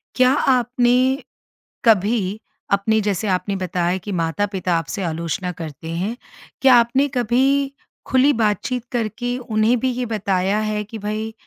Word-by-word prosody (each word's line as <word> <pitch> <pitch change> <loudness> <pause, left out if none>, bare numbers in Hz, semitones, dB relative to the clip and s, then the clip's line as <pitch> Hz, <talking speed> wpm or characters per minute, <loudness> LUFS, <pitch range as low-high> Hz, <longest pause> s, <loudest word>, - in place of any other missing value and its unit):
क्या 255 0 +5
आपने 250 0 +2 0.6
कभी, 210 -1 +2 0.3
अपने 210 +2 +2
जैसे 205 0 -1
आपने 195 +1 0
बताया 180 -1 -1
कि 205 +2 -7
माता-पिता 185 +1 -1
आपसे 165 +4 -4
आलोचना 170 +1 -3
करते 160 -2 -8
हैं, 185 +7 -2 0.5
क्या 265 -2 +7
आपने 240 +4 +3
कभी 270 +4 +2 0.3
खुली 265 +3 +4
बातचीत 225 +2 0
करके 245 +1 -2
उन्हें 225 -1 +1
भी 260 +1 0
ये 250 0 -3
बताया 200 -2 0
है 215 -1 -1
कि 220 +2 -9
भाई 215 +2 -4
215 Hz, 135 wpm, -21 LUFS, 190-245 Hz, 0.6 s, क्या